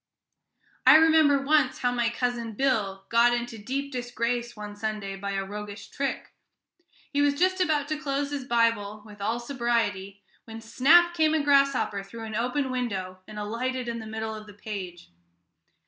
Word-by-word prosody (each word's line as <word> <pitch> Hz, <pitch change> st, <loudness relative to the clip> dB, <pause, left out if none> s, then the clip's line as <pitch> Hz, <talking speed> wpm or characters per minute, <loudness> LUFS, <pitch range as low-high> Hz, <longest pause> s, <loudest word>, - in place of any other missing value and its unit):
I -, -, +8 dB
remember 315 Hz, -3 st, +6 dB
once 285 Hz, -2 st, +3 dB
how 245 Hz, -, 0 dB
my 240 Hz, -1 st, +1 dB
Cousin 235 Hz, -2 st, -2 dB
Bill 205 Hz, -6 st, 0 dB
got 235 Hz, +1 st, +4 dB
into 240 Hz, -2 st, -5 dB
deep 275 Hz, +6 st, -4 dB
disgrace 240 Hz, -1 st, -2 dB
one 210 Hz, -1 st, -8 dB
Sunday 210 Hz, -2 st, -4 dB
by 200 Hz, +1 st, -4 dB
a 195 Hz, 0 st, -2 dB
roguish 205 Hz, 0 st, -8 dB
trick. 275 Hz, 0 st, -4 dB, 0.8 s
He 285 Hz, -, +2 dB
was 285 Hz, 0 st, +3 dB
just 370 Hz, +2 st, +2 dB
about 305 Hz, -5 st, +1 dB
to 310 Hz, -1 st, -2 dB
close 285 Hz, -1 st, -2 dB
his 285 Hz, -2 st, -3 dB
Bible 230 Hz, -4 st, +1 dB
with 210 Hz, -1 st, -13 dB
all 225 Hz, +4 st, -1 dB
sobriety, 230 Hz, -6 st, -2 dB, 0.2 s
when 225 Hz, 0 st, -8 dB
snap 320 Hz, +10 st, +4 dB
came 315 Hz, -2 st, +2 dB
a 310 Hz, -, +1 dB
grasshopper 275 Hz, -7 st, +2 dB
through 225 Hz, +4 st, -10 dB
an 220 Hz, -1 st, -6 dB
open 250 Hz, +4 st, -1 dB
window, 195 Hz, -7 st, -3 dB
and 215 Hz, -, -10 dB
alighted 240 Hz, +4 st, -3 dB
in 235 Hz, 0 st, -3 dB
the 220 Hz, -, -8 dB
middle 220 Hz, 0 st, -4 dB
of 215 Hz, -1 st, -9 dB
the 205 Hz, -, -13 dB
page. 185 Hz, -, -7 dB
235 Hz, 170 wpm, -27 LUFS, 210-275 Hz, 0.8 s, I